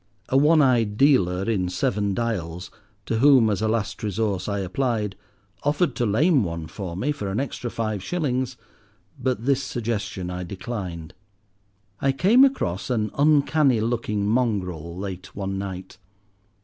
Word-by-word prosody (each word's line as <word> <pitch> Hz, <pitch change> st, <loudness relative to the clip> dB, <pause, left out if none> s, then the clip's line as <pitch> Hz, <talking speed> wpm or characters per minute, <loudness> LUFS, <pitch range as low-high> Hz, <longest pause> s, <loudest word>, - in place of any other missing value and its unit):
A -, -, 0 dB
one 150 Hz, +3 st, +5 dB
eyed 115 Hz, -6 st, +2 dB
dealer 95 Hz, -10 st, +3 dB
in 95 Hz, -5 st, 0 dB
Seven 100 Hz, +2 st, 0 dB
Dials, 90 Hz, -7 st, -3 dB, 0.3 s
to 110 Hz, -, -1 dB
whom, 130 Hz, -5 st, +6 dB
as 105 Hz, -, -1 dB
a 110 Hz, -, +1 dB
last 110 Hz, -1 st, -1 dB
resource, 105 Hz, -2 st, -1 dB
I 100 Hz, -, -1 dB
applied, 105 Hz, +1 st, -1 dB, 0.5 s
offered 145 Hz, 0 st, +1 dB
to 120 Hz, -, +1 dB
lame 140 Hz, -, +3 dB
one 85 Hz, -2 st, -4 dB
for 90 Hz, +1 st, -6 dB
me 130 Hz, +10 st, 0 dB
for 145 Hz, -9 st, -4 dB
an 95 Hz, -, -1 dB
extra 125 Hz, -2 st, -3 dB
five 110 Hz, -4 st, -3 dB
shillings, 130 Hz, -, -2 dB, 0.6 s
but 125 Hz, -2 st, -1 dB
this 135 Hz, -1 st, +2 dB
suggestion 105 Hz, -8 st, -3 dB
I 90 Hz, 0 st, -4 dB
declined. 90 Hz, -4 st, -6 dB, 0.9 s
I 135 Hz, 0 st, +2 dB
came 215 Hz, -, +5 dB
across 100 Hz, -, 0 dB
an 110 Hz, -4 st, 0 dB
uncanny 145 Hz, -3 st, +3 dB
looking 110 Hz, -3 st, -1 dB
mongrel 95 Hz, -8 st, -1 dB
late 95 Hz, -2 st, -7 dB
one 95 Hz, -1 st, -3 dB
night. 95 Hz, -1 st, -7 dB
110 Hz, 150 wpm, -24 LUFS, 95-130 Hz, 0.9 s, whom